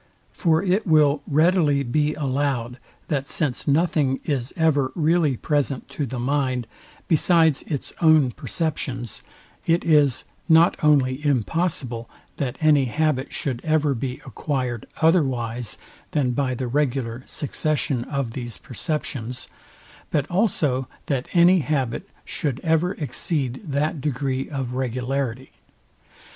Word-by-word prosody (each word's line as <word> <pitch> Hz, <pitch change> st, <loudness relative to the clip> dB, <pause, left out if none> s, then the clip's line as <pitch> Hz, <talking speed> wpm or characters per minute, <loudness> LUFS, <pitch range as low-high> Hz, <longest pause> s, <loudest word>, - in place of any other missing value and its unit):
For 165 Hz, -1 st, +2 dB
it 195 Hz, +2 st, +1 dB
will 150 Hz, -3 st, +4 dB
readily 155 Hz, -2 st, +3 dB
be 150 Hz, +4 st, 0 dB
allowed, 130 Hz, -4 st, -1 dB, 0.3 s
that 140 Hz, -3 st, -1 dB
since 140 Hz, -6 st, -1 dB
nothing 145 Hz, -3 st, +2 dB
is 135 Hz, -4 st, -1 dB
ever 145 Hz, -5 st, +2 dB
really 160 Hz, -4 st, +2 dB
present 145 Hz, -2 st, -1 dB
to 145 Hz, -, -3 dB
the 125 Hz, +2 st, -5 dB
mind, 130 Hz, -1 st, 0 dB, 0.4 s
besides 160 Hz, -2 st, +4 dB
its 145 Hz, -5 st, -4 dB
own 155 Hz, -6 st, +5 dB
perceptions, 130 Hz, -, -3 dB, 0.5 s
it 165 Hz, +1 st, +2 dB
is 150 Hz, -6 st, +4 dB, 0.3 s
not 165 Hz, +2 st, +6 dB
only 140 Hz, -2 st, +3 dB
impossible, 135 Hz, -, -1 dB, 0.3 s
that 130 Hz, -4 st, -2 dB
any 150 Hz, -3 st, +5 dB
habit 145 Hz, +1 st, 0 dB
should 130 Hz, -4 st, -3 dB
ever 155 Hz, -2 st, +2 dB
be 125 Hz, +1 st, -3 dB
acquired 125 Hz, -6 st, -3 dB, 0.2 s
otherwise 125 Hz, -, +1 dB, 0.4 s
than 135 Hz, -4 st, +2 dB
by 130 Hz, 0 st, 0 dB
the 125 Hz, +1 st, -3 dB
regular 130 Hz, -3 st, -1 dB
succession 145 Hz, -4 st, -1 dB
of 140 Hz, -5 st, -2 dB
these 120 Hz, -1 st, -6 dB
perceptions, 125 Hz, -2 st, -4 dB, 0.6 s
but 145 Hz, -2 st, +1 dB
also 155 Hz, -, +1 dB, 0.2 s
that 135 Hz, -2 st, -2 dB
any 180 Hz, +2 st, +6 dB
habit 135 Hz, -6 st, -2 dB, 0.2 s
should 140 Hz, -4 st, -3 dB
ever 165 Hz, +2 st, +2 dB
exceed 140 Hz, -2 st, -2 dB
that 150 Hz, 0 st, -1 dB
degree 135 Hz, -1 st, -2 dB
of 135 Hz, -4 st, -3 dB
regularity. 130 Hz, 0 st, -2 dB
140 Hz, 120 wpm, -23 LUFS, 130-155 Hz, 0.6 s, not